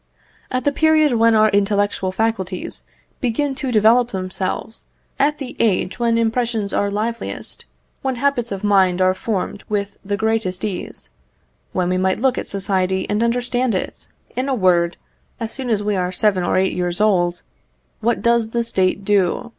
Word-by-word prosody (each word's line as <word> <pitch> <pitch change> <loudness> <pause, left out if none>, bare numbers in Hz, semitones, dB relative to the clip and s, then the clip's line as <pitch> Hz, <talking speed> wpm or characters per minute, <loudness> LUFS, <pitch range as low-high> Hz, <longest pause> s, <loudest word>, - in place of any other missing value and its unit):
At 255 0 -1
the 285 - +2
period 310 -1 +3
when 230 -1 +4
our 215 0 +5
intellectual 205 -1 +1
faculties 190 -3 -2 0.3
begin 270 +3 0
to 265 -1 -3
develop 230 +2 +4
themselves, 190 +2 -4 0.3
at 295 +2 +2
the 270 -3 -7
age 190 -3 +1
when 230 -1 +2
impressions 230 -2 0
are 200 - +1
liveliest, 220 +3 -3 0.4
when 265 -1 -1
habits 245 -3 0
of 195 0 -4
mind 190 -3 +3
are 185 0 +4
formed 200 0 -3
with 200 -1 -2
the 200 0 -2
greatest 220 -4 -1
ease 195 -4 -6 0.6
when 180 -1 0
we 185 0 +1
might 190 +1 +1
look 260 +1 +1
at - - -6
society 190 -1 0
and 210 +2 +1
understand 245 0 0
it 185 - -4 0.3
in 255 +2 -1
a 265 - +1
word, 175 -5 +2 0.4
as 225 -1 -4
soon 265 -2 -5
as 210 -3 +1
we 210 0 0
are 180 -1 -1
seven 190 -1 +1
or - - +1
eight 190 0 +2
years 175 -1 -1
old, 180 -5 +2 0.6
what 235 +2 0
does 235 -1 +3
the 235 +1 0
State 195 -3 0
do? 200 +2 +1
210 Hz, 170 wpm, -20 LUFS, 190-235 Hz, 0.6 s, our